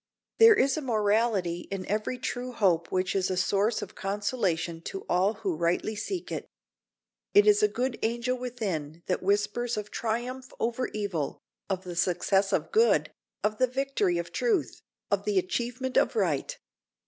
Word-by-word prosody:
There 450 -1 +9
is 275 -6 +2
a - - -2
morality 210 - +1
in 195 -2 -4
every 215 +5 -1
true 250 +1 -4
hope 175 -7 +2
which 185 0 0
is 190 -1 +1
a 185 - -1
source 200 +4 +1
of - - -9
consolation 195 -5 -1
to 195 - -6
all 190 +5 +2
who 375 -4 -2
rightly 175 - 0
seek 335 - -4
it. - - -4 0.9
It 410 +1 +8
is 420 0 +5
a 420 - +6
good 255 -8 -2
angel 235 +2 0
within 190 -11 -4
that 180 - -1
whispers 210 +4 0
of 210 0 -5
triumph 245 +3 -3
over 240 +2 0
evil, 195 -9 -3 0.3
of 190 -1 -2
the 180 -2 -6
success 190 +3 +2
of - - 0
good, 460 +1 +3 0.3
of 210 0 0
the 255 - +4
victory 250 -8 0
of 170 0 -4
truth, 425 - 0 0.3
of - - +1
the 420 -2 0
achievement 260 -8 -1
of - - +3
right. - - 0
215 Hz, 165 wpm, -28 LUFS, 185-255 Hz, 0.9 s, There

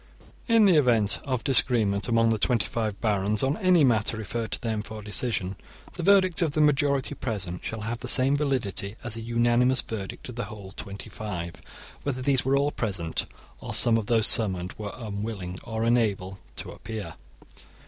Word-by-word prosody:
* - - -24
In 230 -3 +5
the 185 -5 +5
event 115 -7 +3
of 130 -3 -2
disagreement 115 -6 +2
among 115 -1 +3
the 110 - 0
twenty 115 -1 +1
five 110 -4 -3
barons 105 0 0
on 135 +2 +1
any 185 -5 +4
matter 115 -3 +2
referred 110 +1 -4
to - - -1
them 110 -3 -2
for 110 0 -9
decision, 100 -3 -1 0.4
the 175 - -6
verdict 185 -1 +4
of 160 -4 +1
the - - +1
majority 140 -2 +2
present 100 -7 -4
shall 110 -1 -4
have 115 +2 -4
the - - -6
same 135 +2 +4
validity 120 - -2
as 120 -3 -4
a 115 - -6
unanimous 120 +2 +2
verdict 100 -4 -6
of 125 -2 -9
the 125 - -2
whole 100 -4 -10
twenty 100 0 -8
five, 90 -6 -5 0.5
whether 130 -3 -3
these 135 -1 +2
were 135 +1 +2
all 140 +1 +1
present 95 - -3 0.3
or - - -2
some 115 -2 +6
of 110 -2 -1
those 115 -2 +3
summoned 95 -6 +4
were 105 -1 -6
unwilling 100 -5 -5
or 110 0 -3
unable 105 -5 0 0.2
to - - -6
appear. 110 -2 -7
115 Hz, 185 wpm, -26 LUFS, 105-130 Hz, 0.5 s, some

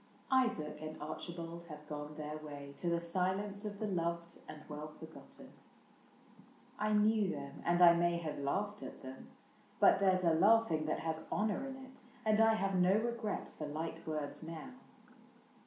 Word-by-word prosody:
Isaac 245 -13 +2
and 155 0 -6
Archibald 170 +2 -6
have 150 -2 -10
gone 150 0 -6
their 150 0 -4
way 145 -2 -8
To 175 - -1
the 170 0 +2
silence 190 +4 -1
of 205 -1 -4
the 215 - -2
loved 170 -3 -2
and 150 0 -9
well 150 0 -6
forgotten. 160 +1 -12 1.3
I 215 0 +1
knew 210 -1 +4
them, 140 -4 -6
and 175 +1 +4
I 170 -1 +10
may 170 0 +2
have 160 -4 -4
laughed 205 +9 -1
at - - -8
them; 130 0 -9 0.5
But - - +6
there 190 -2 +4
's 185 - -4
a 165 -2 +4
laughing 195 -3 +4
that 155 - -1
has 160 0 -3
honor 215 +5 0
in 265 - -6
it. 265 0 -13 0.3
And 215 0 +4
I 225 0 +6
have 195 -2 0
no 185 +1 +4
regret 230 -1 -2
for 150 - -3
light 160 +2 -5
words 150 -2 -3
now. 165 +11 -7
170 Hz, 170 wpm, -35 LUFS, 155-205 Hz, 1.3 s, I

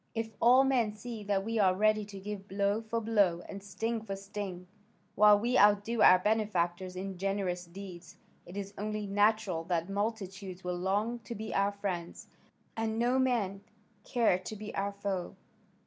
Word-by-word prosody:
If 225 0 -2
all 250 +3 +7
men 240 -6 +1
see 225 -1 -7
that 200 -1 0
we 225 0 -1
are 185 -2 +4
ready 215 +1 +2
to 200 -1 -9
give 200 0 -6
blow 200 +2 0
for 230 +1 -2
blow 200 -6 +2
and 200 - -7
sting 225 +4 -3
for 200 -3 -5
sting, 195 -2 -6 0.5
while 210 0 +7
we 240 +5 +1
outdo 210 +2 +4
our 185 - +8
benefactors 185 -3 0
in 190 0 -5
generous 190 -2 -1
deeds, 175 -1 -10 0.3
it 180 +3 -9
is 200 0 -5
only 215 0 -3
natural 205 -3 +2
that 170 0 -1
multitudes 195 -3 -4
will 180 0 -3
long 205 +6 0
to 235 +1 -8
be 220 +2 -5
our 200 +1 +2
friends, 185 -4 -4 0.5
and 225 0 -1
no 245 +3 +2
man 220 -7 0 0.4
care 230 -8 +2
to 185 +4 -7
be 215 +1 -7
our 200 +1 -1
foe. 200 -2 -3
200 Hz, 170 wpm, -31 LUFS, 190-220 Hz, 0.5 s, our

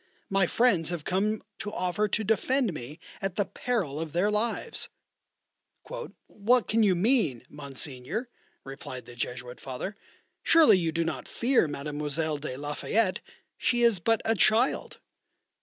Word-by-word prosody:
My 195 -2 +3
friends 195 -10 +3
have 175 -3 -3
come 210 +4 0 0.2
to 205 - -4
offer 185 +2 0
to 215 +2 0
defend 225 +2 +1
me 145 +4 -8 0.2
at 195 -2 -2
the 205 - +1
peril 190 - -2
of 160 -2 -5
their 190 +5 +2
lives." 215 +3 -1 1.4
"What 230 +4 +2
can 225 +1 +2
you 200 -4 +4
mean, 175 - +2
Monseigneur?" 140 - -4 0.4
replied 130 -2 -8
the 120 0 -12
Jesuit 125 +1 -5
Father. 135 +10 -5 0.5
"Surely 320 - +6
you 165 -2 0
do 165 +1 0
not - - -4
fear 240 -7 +2
Mademoiselle 150 +1 -2
de 135 -3 -5
la 145 +1 -4
Fayette? 205 +4 +1 0.4
she 240 -1 +2
is 230 -5 +4
but 225 +6 +1
a 225 - +3
child." 220 +5 +2
180 Hz, 145 wpm, -28 LUFS, 145-220 Hz, 1.4 s, Surely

